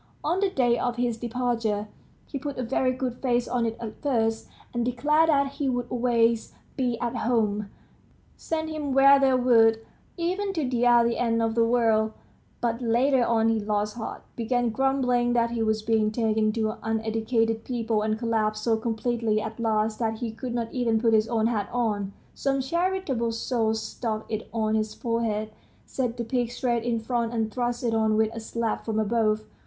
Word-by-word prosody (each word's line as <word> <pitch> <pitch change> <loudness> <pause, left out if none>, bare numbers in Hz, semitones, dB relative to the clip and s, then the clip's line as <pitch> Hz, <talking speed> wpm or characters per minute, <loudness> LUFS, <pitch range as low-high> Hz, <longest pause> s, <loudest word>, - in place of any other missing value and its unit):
On 345 +5 +1
the 400 -1 +2
day 240 -7 +2
of 245 -1 -1
his 240 -1 0
departure, 230 -3 -1 0.4
he 280 - -5
put 285 0 -5
a 255 - -2
very 255 +1 +1
good 255 -1 -3
face 245 -2 +1
on 240 -2 0
it 225 0 -4
at 220 -2 -7
first, 225 -5 0 0.3
and 240 0 0
declared 295 +7 +2
that 280 -2 +3
he 280 -1 -2
would 245 -1 -1
always 235 -2 +1 0.2
be 250 -4 -1
at 240 0 -2
home, 210 -4 0 0.7
send 315 -1 -3
him 295 -3 -3
where 275 +1 +7
they 265 -1 +4
would, 225 -3 +4 0.3
even 375 +4 -1
to 315 -7 -1
the 245 -1 +1
other 235 -1 +5
end 230 -1 0
of 225 0 +1
the 230 0 +3
world; 225 -2 +2 0.5
but 235 0 -1
later 245 +3 +3
on 225 -1 +2
he 225 -1 +1
lost 210 0 -1
heart, 230 - -6
began 240 0 0
grumbling 250 -1 +1
that 235 -1 +2
he 235 -1 -2
was 220 -1 0
being 220 -1 +2
taken 215 -1 +1
to 220 0 -2
uneducated 225 0 0
people, 230 -3 -1
and 215 0 0
collapsed 215 -2 -1
so 230 -2 +3
completely 225 -1 -1
at 220 +1 -6
last 220 -1 0
that 225 -2 -1
he 230 -1 -3
could 240 +2 -5
not 230 -1 -3
even 235 -3 +1
put 225 0 +2
his 215 0 +4
own 225 -2 +1
hat 220 -4 0
on. 210 -5 -1 0.2
Some 275 -1 0
charitable 285 -5 -1
soul 225 -1 0
stuck 220 0 -4
it 215 0 -4
on 220 -1 0
his 215 -1 -1
forehead, 225 -2 -1 0.3
set 250 -3 -3
the 235 - -2
peak 240 0 -1
straight 240 -2 -1
in 235 -1 0
front, 235 0 -2
and 220 -1 -1
thrust 245 0 -2
it 235 -2 0
on 220 -1 +2
with 220 0 +2
a 230 - -5
slap 225 0 -3
from 220 -1 -2
above. 215 0 +1
230 Hz, 190 wpm, -26 LUFS, 220-250 Hz, 0.7 s, where